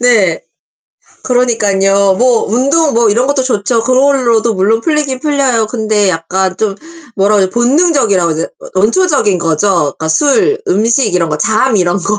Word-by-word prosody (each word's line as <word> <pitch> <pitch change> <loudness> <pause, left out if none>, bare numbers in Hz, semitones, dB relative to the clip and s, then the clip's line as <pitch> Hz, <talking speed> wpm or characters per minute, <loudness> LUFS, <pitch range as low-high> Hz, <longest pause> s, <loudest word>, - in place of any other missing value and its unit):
네. 220 -9 +1 0.8
그러니깐요. 200 -6 +1
뭐 245 -2 +2
운동 280 +5 +1
뭐 230 -1 +2
이런 240 +6 0
것도 280 -2 0
좋죠. 230 -2 -1
그걸로도 255 -4 +1
물론 205 +4 +1
풀리긴 290 -2 -2
풀려요. 275 -7 0
근데 215 -3 -1
약간 185 +2 -2
좀 210 -2 -2 0.4
뭐라고 200 0 +2
해야지 185 - -2
본능적이라고 240 - +1
해야 - - -5
되나? 165 - -3 0.3
원초적인 215 - +1
거죠. 165 +3 -1 0.3
그니까 160 - -5
술, 370 - +1
음식 230 - +1
이런 170 -2 0
거 150 - -3
잠 220 +4 +1
이런 175 -1 0
거. 205 +3 -2
225 Hz, 335 characters per minute, -12 LUFS, 195-260 Hz, 0.8 s, 뭐